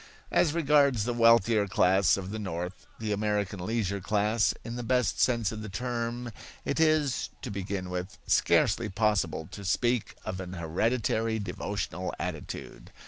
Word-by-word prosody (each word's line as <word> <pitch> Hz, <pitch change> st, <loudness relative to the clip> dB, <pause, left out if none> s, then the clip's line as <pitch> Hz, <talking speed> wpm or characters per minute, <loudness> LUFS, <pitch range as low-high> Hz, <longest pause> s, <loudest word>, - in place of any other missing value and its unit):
As 160 Hz, -2 st, +3 dB
regards 140 Hz, -7 st, +4 dB
the 120 Hz, -, 0 dB
wealthier 115 Hz, -2 st, +4 dB
class 95 Hz, +1 st, +4 dB
of 95 Hz, 0 st, -5 dB
the 110 Hz, -, -4 dB
North, 90 Hz, -1 st, -5 dB
the 110 Hz, -1 st, -3 dB
American 105 Hz, -2 st, -1 dB
leisure 100 Hz, -2 st, -1 dB
class 105 Hz, +2 st, +2 dB
in 115 Hz, 0 st, -6 dB
the 120 Hz, -, -3 dB
best 125 Hz, 0 st, +1 dB
sense 115 Hz, -5 st, +2 dB
of 110 Hz, -1 st, -6 dB
the 110 Hz, -, -6 dB
term, 120 Hz, +2 st, -3 dB, 0.3 s
it -, -, -1 dB
is, 155 Hz, -4 st, +2 dB
to 125 Hz, -, -4 dB
begin 100 Hz, -1 st, -3 dB
with, 90 Hz, +1 st, -4 dB
scarcely -, -, +3 dB
possible 95 Hz, -6 st, 0 dB
to 100 Hz, -, -8 dB
speak 120 Hz, +5 st, 0 dB
of 95 Hz, -, -4 dB
an 90 Hz, -1 st, -6 dB
hereditary 110 Hz, +6 st, 0 dB
devotional 95 Hz, -2 st, -4 dB
attitude. 85 Hz, -4 st, -6 dB
105 Hz, 150 wpm, -29 LUFS, 95-120 Hz, 0.3 s, regards